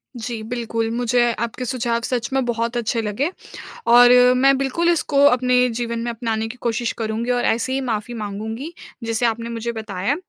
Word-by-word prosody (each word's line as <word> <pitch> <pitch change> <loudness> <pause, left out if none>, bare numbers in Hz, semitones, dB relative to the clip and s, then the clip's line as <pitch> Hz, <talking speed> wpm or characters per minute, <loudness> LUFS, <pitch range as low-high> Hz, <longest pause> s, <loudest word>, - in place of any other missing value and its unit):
जी, 235 -1 -5
बिल्कुल। 230 -1 -3
मुझे 240 0 +2
आपके 235 +2 -3
सुझाव 235 -1 -1
सच 240 -1 -2
में 270 -1 +2
बहुत 235 0 -1
अच्छे 230 0 -1
लगे 225 - -2 0.6
और 245 +1 +8 0.3
मैं 270 +1 +4
बिल्कुल 275 +6 0
इसको 290 -4 +2
अपने 250 -1 +4
जीवन 235 -1 -2
में 235 +1 -2
अपनाने 225 -1 -2
की 235 +3 -9
कोशिश 235 0 -1
करुँगी 225 +2 -2
और 245 0 0
ऐसे 235 +3 0
ही 270 - 0
माफ़ी 230 -2 -3
माँगूँगी, 220 +7 -5 0.3
जैसे 230 +1 0
आपने 230 0 -1
मुझे 235 0 -3
बताया। 220 +2 -2
235 Hz, 175 wpm, -21 LUFS, 225-250 Hz, 0.6 s, और